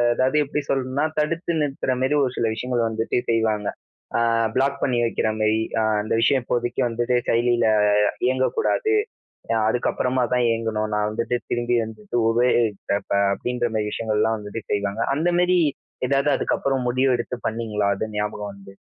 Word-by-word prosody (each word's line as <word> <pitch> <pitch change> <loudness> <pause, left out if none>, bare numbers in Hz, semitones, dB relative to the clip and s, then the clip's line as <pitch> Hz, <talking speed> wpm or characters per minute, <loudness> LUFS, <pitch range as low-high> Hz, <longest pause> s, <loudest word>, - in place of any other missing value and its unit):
அதாவது 130 +4 +2
எப்டி 150 +1 -2
சொல்லணும்னா, 135 +2 0
தடுத்து 165 +2 -1
நிறுத்துற 135 -2 -1
மாதிரி 145 +3 +2
ஒரு 125 - -1
சில 115 -1 +1
விஷயங்கள் 120 0 -1
வந்துட்டு 110 +2 -1
செய்வாங்க. 110 -2 +1 0.5
ஆ - - +2 0.4
பிளாக் 140 +1 +1
பண்ணி 125 -3 +1
வைக்கிற 115 -1 0
மாதிரி. 110 +1 +2 0.4
அந்த 105 - -3
விஷயம் 130 +2 +3
இப்போதைக்கு 120 0 -1
வந்துட்டு 120 +2 0
செயலியில 120 0 +2 0.6
இயங்கக்கூடாது. 435 - +1 0.7
அதுக்கு 120 +2 +1
அப்புறமா 125 0 0
தான் 125 -1 +2
இயங்கணும். 110 -2 -1
நான் 105 0 +1
வந்துட்டு 115 +3 -1
திரும்பி 120 0 +1
வந்துட்டு 110 +1 -5
உபயோகிக்கிறப்ப 115 -4 +1 0.2
அப்டின்ற 120 +3 -2
மாதிரி 105 -1 0
விஷயங்கள்லாம் 110 0 0
வந்துட்டு 105 +1 -7
செய்வாங்க. 100 +2 -1
அந்த 165 +4 +1
மாதிரி 180 0 +3 0.5
ஏதாவது 140 +1 +2
அதுக்கப்புறம் 135 -2 -1
முடிவு 130 +1 +2
எடுத்து 120 +1 -4
பண்ணீங்களா? 110 -2 -1
அது 110 +3 -4
ஞாபகம் 105 0 -3
வந்து. 100 0 -14
120 Hz, 145 wpm, -23 LUFS, 110-130 Hz, 0.7 s, விஷயம்